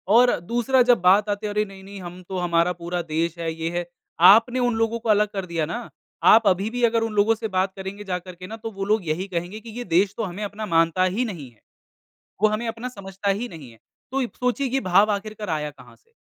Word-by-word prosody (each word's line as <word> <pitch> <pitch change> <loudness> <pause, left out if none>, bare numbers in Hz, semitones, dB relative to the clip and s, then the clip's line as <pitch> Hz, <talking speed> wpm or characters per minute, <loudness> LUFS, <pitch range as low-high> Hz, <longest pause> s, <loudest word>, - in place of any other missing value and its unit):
और 245 +1 +6
दूसरा 240 +8 +1
जब 240 - +3
बात 195 +4 +4
आती 205 +1 -2
है - - -3
अरे 210 0 +2
नहीं-नहीं 195 0 -11
हम 180 +1 -9
तो 190 - -3
हमारा 175 0 +2
पूरा 175 +1 -2
देश 165 +1 -2
है 165 -1 -2
ये 165 0 -3
है 175 - -2 0.5
आपने 240 +4 +4
उन 245 -2 +1
लोगों 225 +1 0
को 225 -1 -5
अलग 210 0 +4
कर 195 -2 -3
दिया 165 -3 -2
ना, 235 +10 -5 0.3
आप 220 -1 +7
अभी 195 +3 +2
भी 245 +1 -3
अगर 230 -1 +3
उन 225 -1 -3
लोगों 210 +2 +3
से 220 0 -4
बात 190 0 0
करेंगे 195 +1 -7
जाकर 180 -2 -5
के 185 +1 -10
ना 225 - -7
तो 225 0 -6
वो 195 -1 -4
लोग 210 -4 +1
यही 175 +5 -1
कहेंगे 180 +3 -4
कि 230 - -12
ये 245 - -3
देश 190 +3 +3
तो 225 - -1
हमें 195 +2 -5
अपना 205 +1 -5
मानता 165 0 +2
ही 190 +7 0
नहीं 165 - -7
है, 110 - -29 0.8
वो 215 - +6
हमें 215 +3 -2
अपना 230 +2 -4
समझता 200 -3 -4
ही 220 +5 -1
नहीं 150 - -11
है 115 - -19 0.3
तो 270 - 0
अब 240 - -3
सोचिए 250 +2 0
कि 270 +2 0
भाव 195 +1 +4
आख़िर 215 +2 -4
कराया 155 -8 -2
कहाँ 145 - -17
से? 460 - -36
200 Hz, 250 wpm, -23 LUFS, 175-225 Hz, 0.8 s, आप